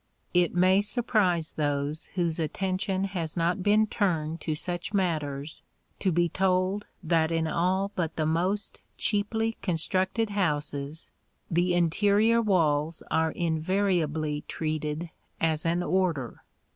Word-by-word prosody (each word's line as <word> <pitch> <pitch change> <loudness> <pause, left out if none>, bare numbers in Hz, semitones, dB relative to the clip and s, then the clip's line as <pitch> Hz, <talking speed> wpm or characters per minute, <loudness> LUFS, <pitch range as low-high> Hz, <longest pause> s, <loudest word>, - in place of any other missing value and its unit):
It 175 0 +2
may 185 +2 +5
surprise 205 -7 +1
those 145 +1 -1
whose 170 -3 0
attention 190 +4 -1
has 180 -5 -3
not 170 +3 +1
been 210 +3 +4
turned 165 -7 -1
to 155 - -2
such 175 +5 -3
matters 155 -5 -2 0.4
to 190 - +1
be 175 +1 +2
told 185 +3 0 0.2
that 160 -1 +2
in 165 -1 +1
all 185 +5 0
but 165 -3 -2
the 155 - 0
most 180 +6 -1 0.2
cheaply 225 +2 0
constructed 190 +5 0
houses 150 -5 -2 0.4
the 175 +1 +2
interior 205 +7 +3
walls 160 -6 +1
are 160 0 +2
invariably 160 -3 0
treated 155 +1 -3 0.3
as 160 0 +1
an 170 +2 +1
order. 170 -8 -1
175 Hz, 120 wpm, -27 LUFS, 160-195 Hz, 0.4 s, may